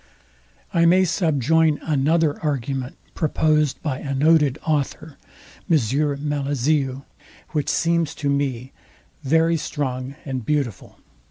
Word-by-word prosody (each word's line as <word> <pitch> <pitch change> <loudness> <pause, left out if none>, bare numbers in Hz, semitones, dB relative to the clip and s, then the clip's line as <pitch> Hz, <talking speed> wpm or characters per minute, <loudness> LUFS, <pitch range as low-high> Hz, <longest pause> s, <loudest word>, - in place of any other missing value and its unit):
I 170 0 +4
may 185 +2 +5
subjoin 160 - +2
another 155 +1 +1
argument 135 -3 -2 0.2
proposed 150 -2 +1
by 140 -4 -2
a 140 -2 -4
noted 150 -1 +3
author, 155 0 -2 0.5
which 165 -4 +4 1.9
seems 170 -2 +1
to 145 - -3
me 135 -3 -1 0.5
very 160 +4 +3
strong 135 -3 -4
and 130 -4 -4
beautiful. 135 -4 -2
150 Hz, 95 wpm, -22 LUFS, 135-160 Hz, 1.9 s, may